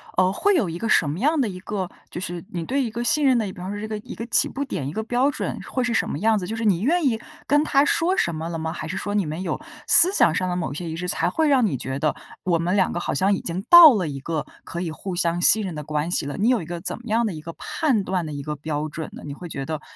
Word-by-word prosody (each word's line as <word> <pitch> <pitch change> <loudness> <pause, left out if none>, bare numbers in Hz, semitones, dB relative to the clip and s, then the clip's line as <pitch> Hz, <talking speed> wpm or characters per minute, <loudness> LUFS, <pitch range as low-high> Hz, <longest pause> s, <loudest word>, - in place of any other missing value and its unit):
呃， 185 0 +3
会 405 - +2
有 225 - +1
一 165 - -5
个 225 - -3
什 155 -8 +3
么 150 - -3
样 300 +3 +2
的 225 - 0
一 180 - -7
个 190 -3 -4 0.2
就 175 - -5
是 175 -1 -5
你 170 -2 -3
对 270 +10 0
一 230 - -3
个 235 +2 -3
信 300 +3 +2
任 260 -2 +5
的 225 - 0
比 190 - -7
方 185 +3 -6
是 205 - -5
这 215 - -4
个 215 -1 -4
一 - - -9
个 230 - -6
起 240 - +4
步 280 - -4
点、 145 - -4
一 145 - -5
个 220 - -2
标 245 +5 +1
准， - - -4
会 255 - 0
是 245 - -1
什 - - +1
么 145 - -4
样 220 +3 +3
子？ 185 - -3
就 220 +5 -4
是 225 - -4
你 190 -5 +2
愿 335 - +2
意 225 -4 +1 0.3
跟 295 +1 +4
他 275 -2 +3
说 335 +5 +1
什 170 - 0
么 160 +1 -4
了 165 -1 -4
吗？ 160 0 -3
还 160 -2 -6
是 175 - -4
说， 205 +1 -3
你 205 -3 +1
们 155 +3 -4
有 185 - -3 0.3
思 360 +3 +7
想 160 - +4
上 185 +1 0
的 180 - -1
某 175 -2 -2
些 165 +4 -5
仪 160 - -4
式， 180 +2 -4
才 180 - 0
会 315 +10 +1
让 260 -4 +4
你 175 -10 0
觉 130 +2 -4
得： 150 +1 0 0.3
“我 175 -2 +1
们 175 +3 0
两 190 -2 +2
个 - - -2
好 175 - -3
像 190 +7 +2
已 195 - -2
经 175 +3 -3
到 340 -5 +10
了 185 -5 -1
一 140 -2 -5
个 155 +1 -3 0.2
可 170 - -6
以 170 -3 -3
互 180 +3 -6
相 175 0 0
信 215 +4 +6
任 185 - -4
的 150 -1 -6
关 150 +3 -2
系 155 - -1
了。” 145 - -5
你 210 - +1
有 250 -5 +2
一 - - -7
个 170 +1 -5
怎 - - -4
么 240 - -12
样 230 +2 +2
的 210 - -2
一 155 - -8
个 165 +2 -8
判 255 - -1
断 185 -1 -1
的 - - -6
一 140 -1 -5
个 150 +1 -4
标 150 +1 -3
准 155 +1 -6
呢？ - - -10
你 145 - -6
会 175 +4 -9
觉 135 -3 -5
得： 155 0 -4
185 Hz, 350 characters per minute, -23 LUFS, 160-230 Hz, 0.3 s, 到